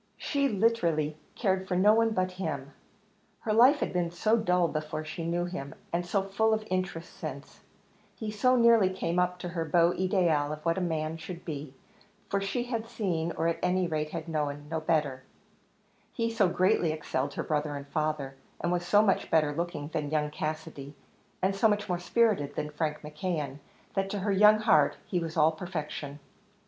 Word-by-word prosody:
She 280 -1 0
literally 175 - +1 0.2
cared 190 -3 0
for 180 - -1
no 205 +4 +6
one 225 0 +3
but 185 -4 0
him; 140 -5 -4 0.7
her 215 - -1
life 255 +7 +6
had - - -1
been 175 -2 0
so 215 +6 +2
dull 180 -6 +2
before 155 0 -4
she 155 +2 -5
knew 175 +1 0
him, 160 -6 -6 0.2
and 175 +1 +1
so 190 +3 0
full 220 +3 +2
of 215 0 -5
interest 185 -2 -2
since 140 -3 -8 0.6
he 215 +2 -4
so 255 +5 +3
nearly 230 -5 +5
came 180 -2 -1
up 180 0 +1
to 175 0 -5
her 170 -1 -2
beau 170 +2 +3
ideal 175 -6 +1
of 150 +1 -7
what 165 +2 +1
a - - -2
man 160 -2 -2
should 170 +2 -8
be, 145 -4 -6 0.5
for 200 - 0
she 195 +5 -1
had 230 -2 -3
seen, 170 -7 -2
or 165 - 0
at 170 - 0
any 180 0 +2
rate 155 -2 -2
had 165 0 -5
known, 145 -2 -2
no 160 - 0
better 150 -5 0 0.9
he 230 0 -1
so 215 -5 +3
greatly 180 -2 +2
excelled 145 -3 -3
her - - -2
brother 150 -1 -1
and 140 0 -7
father, 150 -3 -1 0.3
and 175 - -1
was 175 0 0
so 205 +4 +4
much 195 -3 +1
better 155 -2 +3
looking 165 -2 -3
than 150 -2 -2
young 150 -1 0
Cassidy, 155 -2 -5 0.5
and 195 +1 +2
so 210 +3 +4
much 205 -1 0
more 180 -2 -1
spirited 185 -7 +1
than 150 - -3
Frank 150 0 -2
McKeon, 150 -2 -4 0.3
that 195 0 -1
to 205 - -3
her 205 +1 0
young 210 +2 +6
heart 155 -8 +4
he 180 - -1
was 165 -1 -5
all 155 +1 +5
perfection. 155 -4 -5
170 Hz, 190 wpm, -29 LUFS, 155-195 Hz, 0.9 s, no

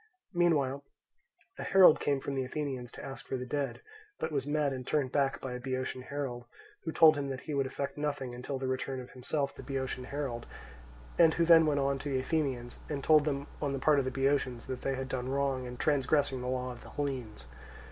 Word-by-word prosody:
Meanwhile 145 -6 +2 0.8
a - - -3
herald 185 -4 +7
came 140 -1 +1
from 140 - -4
the 135 -1 0
Athenians 130 -3 -4
to - - -8
ask 135 0 -8
for 130 - -2
the 125 - -5
dead, 140 +2 -2 0.4
but - - -3
was 140 -2 -1
met 145 -2 +1
and 130 -1 -6
turned 140 -4 +1
back 135 -1 +1
by 130 -2 -5
a 125 - -4
Boeotian 130 0 -3
herald, 130 -3 -4 0.4
who 160 - -3
told 160 -1 +7
him 140 - -2
that 135 -1 -4
he 155 - -5
would 135 -1 +1
effect 140 +2 -4
nothing 140 -4 -2
until 125 +3 -4
the 130 - -4
return 130 0 -2
of 125 - -9
himself 140 +3 -2
the - - -10
Boeotian 130 -2 -3
herald, 130 -4 -4 0.7
and 165 -2 +6
who 170 - +3
then 165 -1 +7
went 145 -2 +2
on 140 0 +1
to 145 - -4
the 135 -2 +1
Athenians, 130 -4 -2
and 140 -3 -3
told 155 -2 +6
them 140 -2 -1 0.2
on 140 -2 0
the - - -1
part 145 +1 +4
of 135 - 0
the - - 0
Boeotians 135 -2 0
that 130 -1 -5
they 135 - -1
had 130 0 -4
done 130 -1 -3
wrong 135 -2 0
in 125 0 -7
transgressing 140 -2 +2
the 125 - -4
law 125 0 -1
of 120 - -10
the - - -12
Hellenes. 125 - -4
135 Hz, 225 wpm, -31 LUFS, 130-145 Hz, 0.8 s, herald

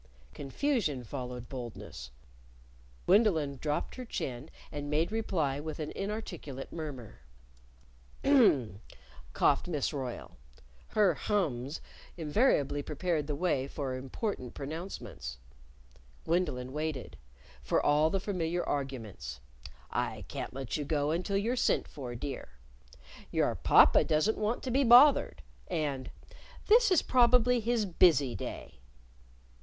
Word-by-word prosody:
Confusion 155 - -1
followed 125 0 -6
boldness. 120 - -8 1.0
Gwendolyn 170 -9 +3
dropped 150 -1 -2
her 255 - -5
chin, 135 - -5 0.2
and 145 -1 -5
made 155 +5 +1
reply 165 -11 -1
with 155 0 -5
an 155 -1 -4
inarticulate 190 -10 -6
murmur. 145 -9 -7 1.0
"Hm!" 140 - +4 0.5
coughed - - +2
Miss 155 -3 -1
Royle. 130 - -6 0.5
(Her 205 -5 +3
hms 150 - -1 0.4
invariably 150 - +2
prepared 155 0 -2
the 150 - -2
way 140 -5 0
for 140 -2 -4
important 130 - -4
pronouncements.) 135 - -6 0.9
Gwendolyn 150 -7 -1
waited 150 -3 -4 0.5
for 65 - +1
all 150 +2 +3
the 195 - 0
familiar 175 -3 -2
arguments: 110 - -4 0.5
I - - -2
can't - - -5
let 135 0 -3
you 150 - -2
go 145 0 0
until 185 +4 -1
you're 225 +5 0
sent - - +1
for, 125 -4 -7
dear; 130 - -6 0.8
Your - - +1
papa - - +6
doesn't 155 +8 +1
want 215 +3 -1
to 255 - -3
be 275 +3 +3
bothered; 260 +4 +6 0.2
and, 140 -4 -2 0.6
This 460 +1 +6
is 370 -5 +4
probably 250 -1 +4
his 230 -1 0
busy 160 -8 +4
day. 60 - -7
150 Hz, 115 wpm, -31 LUFS, 135-200 Hz, 1.0 s, papa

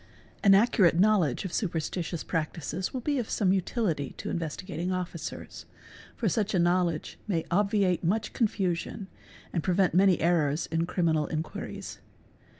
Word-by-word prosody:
_ - - -26 0.4
An 195 -1 +7
accurate 195 -6 +4
knowledge 190 - +3
of 185 - -5
superstitious 170 -2 -2
practices 165 +2 -3
will 260 - -4
be 285 +2 0
of 235 - -4
some 190 -3 +2
utility 180 - -1
to - - -5
Investigating 170 +2 -3
Officer's 180 -3 -5 0.5
©, - - -30
for 230 - 0
such 205 +2 0
a - - +3
knowledge 175 -2 +1
may 170 -6 -1
obviate 195 -2 +2
much 210 +6 0
confusion 195 -2 -1 0.4
and 165 - 0
prevent 185 +1 +2
many 185 0 +4
errors 160 -2 +2
in 165 +1 0
criminal 160 -5 +1
inquiries. 155 0 -5
180 Hz, 150 wpm, -28 LUFS, 165-200 Hz, 0.5 s, An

